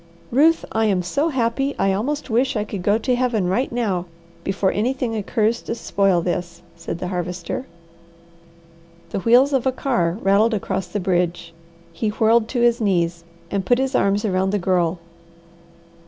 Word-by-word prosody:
"Ruth, 315 Hz, +6 st, +4 dB
I'm 210 Hz, -5 st, +1 dB
so 280 Hz, -, 0 dB
happy 270 Hz, +1 st, -1 dB
I 195 Hz, 0 st, +2 dB
almost 270 Hz, +7 st, -2 dB
wish 250 Hz, +4 st, +1 dB
I 210 Hz, -, 0 dB
could 205 Hz, -2 st, -6 dB
go 205 Hz, +4 st, +2 dB
to 250 Hz, +2 st, 0 dB
Heaven 245 Hz, -6 st, 0 dB
right 210 Hz, +9 st, 0 dB
now 200 Hz, -7 st, -1 dB, 0.4 s
before 195 Hz, 0 st, 0 dB
anything 240 Hz, +1 st, -1 dB
occurs 220 Hz, +2 st, 0 dB
to 230 Hz, -, -4 dB
spoil 195 Hz, -6 st, +1 dB
this," 175 Hz, 0 st, -4 dB
said 165 Hz, -1 st, -5 dB
the 180 Hz, +1 st, -4 dB
Harvester. 180 Hz, +6 st, -4 dB, 1.4 s
The -, -, -2 dB
wheels 245 Hz, +7 st, +4 dB
of 265 Hz, -1 st, +1 dB
a -, -, +3 dB
car 205 Hz, -, 0 dB
rattled 210 Hz, +4 st, +3 dB
across 190 Hz, -2 st, -3 dB
the 205 Hz, +4 st, -3 dB
bridge. 175 Hz, -2 st, -1 dB, 0.4 s
He 215 Hz, +6 st, -1 dB
whirled 220 Hz, +1 st, +3 dB
to 245 Hz, 0 st, -2 dB
his 240 Hz, 0 st, +3 dB
knees, 170 Hz, -4 st, 0 dB, 0.3 s
and 200 Hz, -1 st, -1 dB
put 245 Hz, +6 st, +3 dB
his 265 Hz, 0 st, -1 dB
arms 200 Hz, +2 st, +2 dB
around 190 Hz, -1 st, +1 dB
the 205 Hz, -, +1 dB
Girl. 180 Hz, -2 st, +1 dB
210 Hz, 165 wpm, -21 LUFS, 180-240 Hz, 1.4 s, Ruth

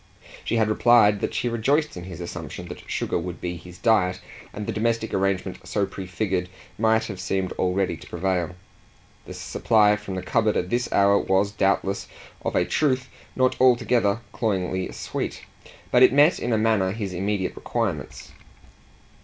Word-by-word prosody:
She -, -, -1 dB
had 110 Hz, -2 st, +3 dB
replied 110 Hz, -2 st, +4 dB
that -, -, -2 dB
she -, -, 0 dB
rejoiced 140 Hz, +7 st, +1 dB
in 90 Hz, -1 st, -7 dB
his 90 Hz, -3 st, -8 dB
assumption 85 Hz, -3 st, -7 dB
that -, -, -10 dB
sugar -, -, -1 dB
would 85 Hz, 0 st, -6 dB
be 90 Hz, 0 st, -4 dB
his 90 Hz, +1 st, -12 dB
diet, 90 Hz, -2 st, +2 dB, 0.3 s
and 105 Hz, -, -6 dB
the 115 Hz, -, -3 dB
domestic 115 Hz, +1 st, -1 dB
arrangement 95 Hz, -1 st, -1 dB
so 100 Hz, -2 st, 0 dB
prefigured 95 Hz, -1 st, -3 dB, 0.3 s
might 110 Hz, 0 st, +3 dB
have 105 Hz, -4 st, -6 dB
seemed 95 Hz, 0 st, -1 dB
already 95 Hz, -1 st, 0 dB
to -, -, -13 dB
prevail. 90 Hz, 0 st, -1 dB, 0.7 s
The -, -, -8 dB
supply 105 Hz, -2 st, +3 dB
from 105 Hz, -2 st, -6 dB
the 95 Hz, -, -4 dB
cupboard 110 Hz, +2 st, +1 dB
at 90 Hz, -, -2 dB
this 120 Hz, 0 st, 0 dB
hour 100 Hz, 0 st, +4 dB
was 95 Hz, +1 st, +1 dB
doubtless, 100 Hz, -1 st, 0 dB, 0.4 s
of -, -, -2 dB
a -, -, +3 dB
truth, 130 Hz, -3 st, 0 dB, 0.3 s
not 130 Hz, 0 st, +2 dB
altogether 120 Hz, -4 st, +3 dB
cloyingly 95 Hz, -4 st, -1 dB
sweet; -, -, -5 dB, 0.5 s
but 125 Hz, -, +5 dB
it 130 Hz, -, +8 dB
met 145 Hz, +5 st, +5 dB
in 120 Hz, -, -2 dB
a 110 Hz, -, +3 dB
manner 110 Hz, -4 st, +2 dB
his 100 Hz, -4 st, -4 dB
immediate 95 Hz, +1 st, -2 dB
requirements. -, -, -3 dB
100 Hz, 165 wpm, -24 LUFS, 95-115 Hz, 0.7 s, it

